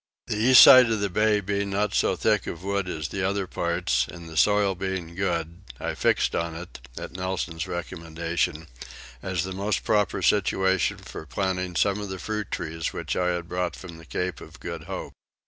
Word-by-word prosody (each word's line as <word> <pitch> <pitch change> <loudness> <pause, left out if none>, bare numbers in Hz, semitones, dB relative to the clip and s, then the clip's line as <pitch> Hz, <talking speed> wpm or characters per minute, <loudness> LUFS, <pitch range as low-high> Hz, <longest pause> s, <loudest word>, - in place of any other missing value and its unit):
The - - -2
east 120 +3 +8
side 130 -2 +9
of 110 - +1
the 100 -2 -1
bay 105 +1 +3
being 100 +1 -2
not 100 +1 0
so 95 - +2
thick 105 +2 +1
of 85 +1 -6
wood 100 -1 -1
as 75 -4 -4
the 100 - -3
other 100 +1 0
parts, 85 -1 0
and 85 -1 -10
the 80 - -10
soil 105 +2 +4
being 95 -2 -4
good, 85 -2 -2 0.2
I - - -2
fixed - - +1
on 85 -1 -2
it, 85 +2 -9 0.2
at - - -6
Nelson's 90 -3 -3
recommendation, 85 -1 -3 0.6
as 90 -3 -2
the 95 0 -4
most 100 +3 -1
proper 105 -2 +1
situation 95 -2 +2
for 80 - -9
planting 95 -1 -2
some 100 +5 +2
of 100 - -5
the 95 - -4
fruit 105 +3 -4
trees 80 0 -3
which - - -3
I 90 - +1
had 85 -1 -2
brought 90 0 -2
from 85 -3 -10
the 80 - -13
Cape 90 +7 -3
of 80 +3 -12
Good 85 -3 -6
Hope. 95 +1 -6
90 Hz, 195 wpm, -26 LUFS, 85-100 Hz, 0.6 s, side